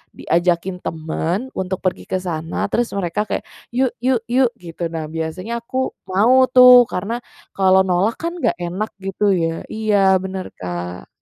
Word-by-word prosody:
diajakin 175 +2 0
temen 165 +9 -3
untuk 190 0 -3
pergi 185 - -2
ke - - -2
sana, 165 -3 -3
terus 240 0 0
mereka 200 +2 -1
kayak, - - -2 0.3
"Yuk, 255 -1 +2
yuk, 255 -1 +3
yuk," 250 -1 +3
gitu. 170 -4 -6
Nah, 160 -2 -4
biasanya 170 +8 -4
aku 255 +3 -2 0.2
mau 240 +8 +4
tuh, 250 -1 +8
karena 215 +6 -3 0.4
kalau 190 0 +4
nolak 185 +5 +1
kan 335 +1 -2
nggak - - +1
enak 180 +5 -3
gitu 195 +1 +1
ya 165 -2 -2
iya 205 -3 +2
bener 190 0 -5
Kak. 90 0 -5
190 Hz, 155 wpm, -20 LUFS, 170-235 Hz, 0.4 s, tuh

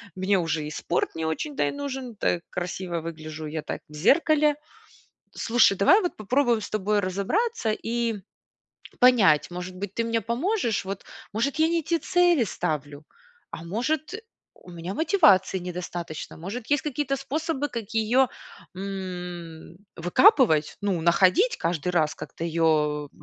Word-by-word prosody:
мне 190 +1 +1
уже 160 -2 -1
и - - -5
спорт 175 - -2
не 160 - -3
очень-то 275 - -2
и - - -1
нужен, 265 -4 -5
так 175 -4 0
красиво 180 -1 -4
выгляжу 155 -1 -7
я 155 +1 -4
так - - -5
в - - -15
зеркале. 300 - +3 0.8
Слушай, 225 -4 +3
давай 375 - +6
вот 355 - -2
попробуем 240 +1 +1
с 205 - -6
тобой 210 0 0
разобраться 220 - -1
и 230 0 -2 0.8
понять, 215 - +5
может 180 +1 -6
быть, 200 +1 -6
ты 230 - 0
мне 230 0 0
поможешь 240 - -1
вот? 195 0 -5 0.3
Может, 275 +7 0
я 315 +1 +4
не 335 0 0
те 335 +2 0
цели 350 -6 +3
ставлю? 150 -6 -4 0.5
А, - - -7
может, 255 - -2 0.4
у 180 - -16
меня 175 +2 -6
мотивации 210 - +4
недостаточно? 175 -2 -6
Может, 210 +8 -6
есть 290 -2 +3
какие-то 280 -1 -2
способы, 290 +1 -2
как 230 -5 -6
ее, 230 +4 +3 0.5
м, 180 -4 -7 0.2
выкапывать? 175 - +4
Ну, 200 -4 -1
находить 195 - +4
каждый 170 0 -1
раз, 155 -4 +1
как-то - - -9
ее 155 -3 +1
200 Hz, 145 wpm, -25 LUFS, 170-270 Hz, 0.8 s, давай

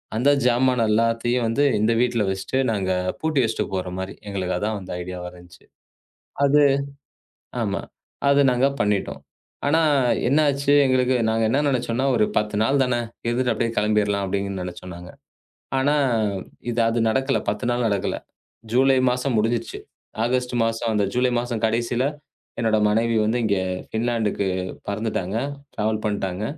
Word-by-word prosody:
அந்தச் 140 +3 +3
ஜாமானை 125 -1 +2
எல்லாத்தையும் 115 +2 +1
வந்து 115 +6 +1 0.2
இந்த 110 +2 +2
வீட்டில் 120 -3 +1
வைத்துவிட்டு 95 +7 -2
நாங்க 95 -4 -1 0.3
பூட்டி 155 -3 0
வைத்துவிட்டு 110 -3 -2
போகிற 90 -1 -3
மாதிரி. 95 +1 -5 0.2
எங்களுக்கு 95 -2 -2
அதுதான் 105 +3 -2
வந்து 95 - -8
ஐடியா 90 0 -6
வாக 90 0 -7
இருந்தது. 85 0 -18 0.8
அது 145 +1 +5 1.0
ஆமா. - - -1 0.5
அது 140 0 +5
நாங்க 125 +2 +3
பண்ணிவிட்டோம். 105 -1 -1 0.5
ஆனா 160 +3 +3 0.5
என்ன 140 +4 +3
ஆச்சு 140 +1 +1
எங்களுக்கு 130 0 +2
நாங்க 110 0 +1
என்ன 135 +5 +2
நினைத்தோம் 120 -3 -1
என்றால் 135 0 +2
ஒரு 105 - +4
10 105 0 -3
நாள் 135 +4 +2
தானே 125 -2 0 0.3
இருந்துவிட்டு 120 0 +1
அப்படியே 115 +1 -1
கிளம்பிடலாம் 105 -1 +1
அப்படி 100 +1 -1
என்று 95 -2 -4
நினைத்தோம் 90 0 -8
நாங்க. 90 0 -11 0.7
ஆனா 145 +3 +2 0.8
இது 120 0 -1
அது 115 +1 0
நடக்கவில்லை. 135 +4 +1
10 105 +4 -4
நாள் 120 -1 0
நடக்கவில்லை. 100 -2 -1 0.5
ஜூலை 135 +2 +4
மாதம் 125 0 -1
முடிந்துவிட்டது. 115 +2 -1 0.4
ஆகஸ்ட் 125 +1 0
மாசம் 115 0 -1
அந்த 105 -2 +1
ஜூலை 125 +1 +2
மாதம் 120 -2 -3
கடைசியில் 120 +2 0 0.6
என்னோட 110 -1 +2
மனைவி 115 +2 +1
வந்து 110 +3 +1
இங்க 100 -3 +1 0.3
பின்லாந்துக்கு 110 -3 0 0.4
பறந்துவிட்டாங்க. 100 -2 -2 0.4
டிராவல் 110 0 -1
பண்ணிவிட்டாங்க. 100 -2 -2
115 Hz, 150 wpm, -23 LUFS, 105-125 Hz, 1.0 s, அது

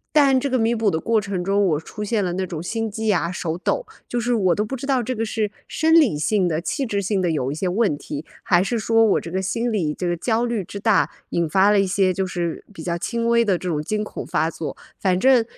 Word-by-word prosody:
但 275 -3 +5
这 275 - -1
个 255 -2 +1
弥 225 +1 +2
补 220 -3 +1
的 160 - 0
过 225 +3 +2
程 195 -3 -3
中 200 +1 +2
我 155 -5 +1
出 210 +6 -7
现 210 -1 0
了 180 -2 -1
那 190 +1 -1
种 165 -3 -5
心 225 +6 -2
悸 220 +1 0
啊， 175 -3 0
手 165 -3 -3
抖， - - -1 0.2
就 245 - -2
是 240 +1 -1
我 185 -6 +3
都 210 - 0
不 215 +5 -4
知 265 - -6
道 270 -2 +2
这 250 +2 -3
个 225 - -1
是 215 -1 -2 0.2
生 320 +1 +1
理 295 - +5
性 190 +3 +2
的 160 -1 -1
器 275 - -2
质 205 -4 -1
性 200 +1 0
的 175 -3 +1
有 135 -4 -1
一 145 - -4
些 185 - -2
问 190 -4 +1
题， 145 +1 -6 0.2
还 175 0 +3
是 235 +4 -1
说 225 +1 +3
我 210 - +3
这 165 - -8
个 190 - -1
心 230 +5 -1
里， 170 -8 0
这 180 - -3
个 175 - 0
焦 225 +6 0
虑 235 -4 -1
之 200 - -8
大， 220 0 +3 0.2
引 170 -2 0
发 195 +4 +4
了 205 - +4
一 195 - +2
些 185 0 +2
就 190 +1 -1
是 170 -2 -3
比 165 -5 -9
较 170 -1 -1
轻 230 +6 -2
微 235 0 +4
的 195 -4 +2
这 180 - -6
种 155 -4 -1
惊 210 +7 -2
恐 - - -6
发 165 - 0
作。 155 -3 -6 0.2
反 185 -2 +1
正 255 +1 +5
200 Hz, 295 characters per minute, -22 LUFS, 175-230 Hz, 0.2 s, 但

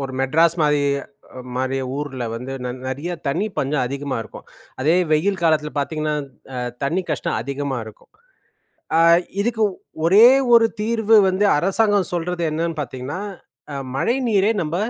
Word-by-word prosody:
ஒரு 135 -1 -5
மெட்ராஸ் 165 +5 +3
மாரி 150 -1 +3 0.8
மாரி 130 +1 -1 0.2
ஊர்ல 135 -4 -4
வந்து 125 +3 -6
நி 125 - -2 0.2
நிறையா 145 +7 -4 0.2
தண்ணி 175 +10 0
பஞ்சம் 135 -1 0
அதிகமா 140 +1 -4
இருக்கும். 110 - -12 0.4
அதே 160 +6 +3 0.2
வெயில் 185 +5 +1
காலத்தில 155 -2 +2
பார்த்தீங்கன்னா, 155 +1 -1 0.4
அ - - -3 0.3
தண்ணி 170 +7 0
கஷ்டம் 150 - -1
அதிகமா 140 0 -3
இருக்கும். 110 - -15 0.9
அ - - +5 0.4
இதுக்கு 225 0 0 0.4
ஒரே 200 +7 +7 0.3
ஒரு 230 -1 +6
தீர்வு 225 0 +2
வந்து 190 +2 +1
அரசாங்கம் 200 +3 +2
சொல்றது 175 0 -2
என்னன்னு 165 +1 -2
பார்த்தீங்கன்னா, 130 +5 -5 0.5
அ - - -4 0.2
மழை 170 - +1
நீரை 205 -1 +3
நம்ப 160 +1 -3
155 Hz, 140 wpm, -21 LUFS, 140-190 Hz, 0.9 s, ஒரே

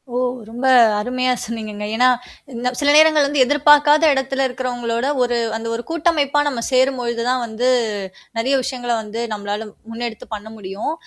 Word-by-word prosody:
ஓ, - - +1 0.3
ரொம்ப 240 +3 -5 0.3
அருமையா 255 +3 0
சொன்னீங்கங்க. 215 -2 -6
என்னா 250 +2 +4 0.5
இந்த, 240 +1 -3
சில 285 0 +2
நேரங்கள்ல 310 -2 +5
வந்து 285 -1 +1
எதிர்பாக்காத 295 +2 +4
இடத்துல 270 0 -1
இருக்கறவங்களோட 245 -1 -3 0.2
ஒரு 245 -1 +1 0.2
அந்த 225 +1 -6
ஒரு 235 - -5
கூட்டமைப்பா 305 -4 +1
நாம 260 -5 -2
சேரும் 260 0 +2
பொழுது 235 -1 -3
தான் 255 0 +1
வந்து, 230 +2 -2 0.7
நெறைய 250 +5 0
விஷயங்கள 250 -2 -4
வந்து 215 +1 -7
நம்மளால 205 +1 -4 0.2
முன்னெடுத்து 230 -1 -6
பண்ண 210 +1 -7
முடியும். 200 +7 -5
250 Hz, 150 wpm, -19 LUFS, 230-275 Hz, 0.7 s, நேரங்கள்ல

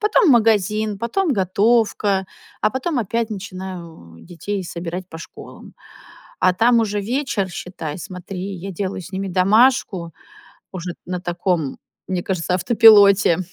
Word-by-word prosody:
Потом 420 -2 +3
магазин, 215 -3 +2
потом 290 - 0
готовка, 200 -1 +1 0.3
а - - +2
потом 260 +4 -2
опять 230 +1 -1
начинаю 185 - -8
детей 190 +3 -5
собирать 175 +1 -6
по 160 - -9
школам. 165 - -12 0.7
А 185 - +3
там 235 +4 +4
уже 210 -2 -1
вечер, 230 -3 -2
считай, 175 -4 -6
смотри, 185 +2 -7
я 190 +2 -7
делаю 190 +1 -4
с 185 - -11
ними 195 0 -3
домашку, 190 -2 +2 0.6
уже 180 -2 -5
на 180 0 -4
таком, 175 -4 -2 0.3
мне 185 -2 -2
кажется, 180 -1 -2
автопилоте. 200 -3 +6
195 Hz, 130 wpm, -20 LUFS, 180-220 Hz, 0.7 s, автопилоте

